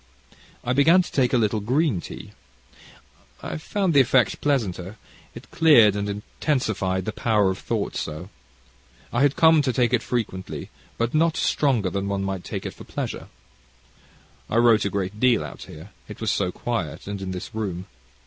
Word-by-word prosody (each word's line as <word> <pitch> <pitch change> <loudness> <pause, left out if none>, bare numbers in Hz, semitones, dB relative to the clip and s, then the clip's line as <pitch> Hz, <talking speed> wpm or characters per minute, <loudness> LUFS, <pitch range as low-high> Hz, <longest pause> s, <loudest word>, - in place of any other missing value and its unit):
I 125 - 0
began 160 +7 +5
to - - -10
take 125 -3 +2
a 130 - +3
little 110 -1 +1
green 125 - +1
tea. - - -9 1.1
I 80 - -4
found 190 - -1
the 140 - +6
effect 125 -4 +2
pleasanter, 105 -8 -1 0.4
it - - -12
cleared 120 -11 +6
and 100 0 -2
intensified 100 - -2
the 110 - -2
power 105 -4 +2
of 95 - -6
thought - - -3
so, 80 +5 -5 0.8
I 120 - +1
had 145 0 +3
come 160 -1 +5
to 130 -2 0
take 120 0 +1
it 120 - +3
frequently, 105 -7 -4 0.3
but 115 0 -1
not 160 +1 +2
stronger 120 -10 +1
than 100 0 -2
one 100 -1 -2
might 95 -2 -3
take - - -5
it - - -4
for - - -12
pleasure. - - -5 1.2
I - - -2
wrote 115 -3 +4
a - - +1
great 100 +1 -3
deal 125 -2 +3
out - - -9
here, 80 +6 -12 0.2
it 105 - -10
was 110 - 0
so 90 -3 0
quiet, 85 -9 -4
and 100 -1 -5
in 95 - -4
this 95 +5 -6
room. 95 -5 -4
110 Hz, 175 wpm, -24 LUFS, 95-130 Hz, 1.2 s, the